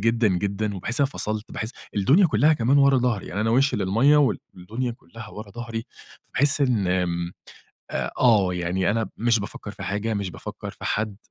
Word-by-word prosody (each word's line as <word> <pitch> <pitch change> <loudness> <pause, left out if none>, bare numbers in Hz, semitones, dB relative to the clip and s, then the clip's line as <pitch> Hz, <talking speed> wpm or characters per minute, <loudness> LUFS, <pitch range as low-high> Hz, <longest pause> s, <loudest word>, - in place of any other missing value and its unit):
جدًا 115 +1 +3
جدًا 100 +3 -1
وباحس 115 +8 -2
إن - - +5
أنا 135 - -2
فصلت، 105 0 -3
باحس 110 +1 -3 0.3
الدنيا 145 - +5
كلّها 145 +4 +4
كمان 135 +1 +3
ورا 140 -1 +5
ضهري 120 -5 0
يعني 100 - -3
أنا 110 +1 +1
وشي 130 +1 +3
للمَيَّة 115 +10 +4
والدنيا 120 -3 -1
كلّها 115 -2 -12
ورا 105 -1 -9
ضهري 115 +1 -5 0.4
فباحس 145 +2 +1
إن 120 -8 +2
آمم، 90 -1 -1 0.6
آآ - - -2
آه 110 -7 +5
يعني 90 +2 0
أنا 110 +1 0
مش 115 0 +2
بافكر 100 - -7
في - - -10
حاجة، 105 +3 -2
مش 100 -3 -2
بافكر - - -7
في - - -12
حد، 105 -2 -1
110 Hz, 185 wpm, -24 LUFS, 100-125 Hz, 0.6 s, إن